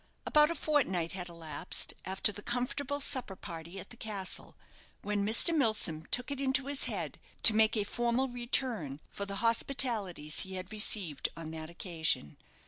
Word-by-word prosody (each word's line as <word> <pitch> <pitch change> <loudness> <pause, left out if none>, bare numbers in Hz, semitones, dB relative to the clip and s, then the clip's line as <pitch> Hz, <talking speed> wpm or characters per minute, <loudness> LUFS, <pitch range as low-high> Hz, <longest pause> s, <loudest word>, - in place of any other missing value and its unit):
About 300 0 +5
a 335 - -2
fortnight 220 - 0
had 180 -2 -6
elapsed 165 -1 0
after 190 +2 +1
the 205 - -8
comfortable 250 +5 -2
supper 255 -7 -1
party 170 0 -8
at - - -10
the - - -8
castle, 205 -4 -3 0.5
when 205 0 -1
Mr. 230 - +4
Milsom 215 - +1
took 250 +3 -2
it 280 -1 -4
into 265 0 +2
his 280 0 +1
head - - -4 0.2
to 225 - +11
make 220 +1 +4
a 210 - +2
formal 240 +5 0
return 240 - 0
for 200 - -5
the 200 - -4
hospitalities 225 - +2
he 190 0 -4
had 185 +2 -7
received 200 -9 +1
on 160 -1 -6
that 160 0 -7
occasion. 165 - -1
210 Hz, 165 wpm, -32 LUFS, 175-250 Hz, 0.5 s, to